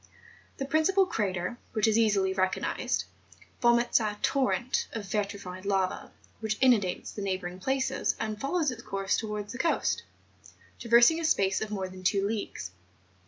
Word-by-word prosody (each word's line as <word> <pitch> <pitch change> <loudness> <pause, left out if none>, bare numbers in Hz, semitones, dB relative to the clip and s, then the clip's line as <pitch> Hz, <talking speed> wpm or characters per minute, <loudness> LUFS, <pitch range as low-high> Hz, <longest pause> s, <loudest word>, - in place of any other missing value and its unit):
The 270 - -3
principal 315 +7 +3
crater, 200 - -2
which 220 0 +2
is 220 - +3
easily 200 -4 +3
recognised, 185 0 0 0.6
vomits 240 0 +4
a 210 -2 -2
torrent 260 -2 +1
of 220 -3 -4
vi¬ 200 0 -1
trified 185 -2 -8
lava' 195 -2 -1 0.3
which 220 -1 -2
inundates 225 -9 +2
the 205 - -7
neighbouring 185 -2 -3
places, 265 +6 0
and 215 -1 -3
follows 300 +1 +1
its 235 -2 -8
course 195 -3 -1
towards 210 -2 -4
the 250 - -7
coast, 330 - +1 0.8
traversing 235 +7 +5
a - - -4
space 195 -11 +2
of 220 - -3
more 195 -3 -3
than 185 0 -11
two 195 +1 +2
leagues. 205 - -4
215 Hz, 155 wpm, -29 LUFS, 195-245 Hz, 0.8 s, traversing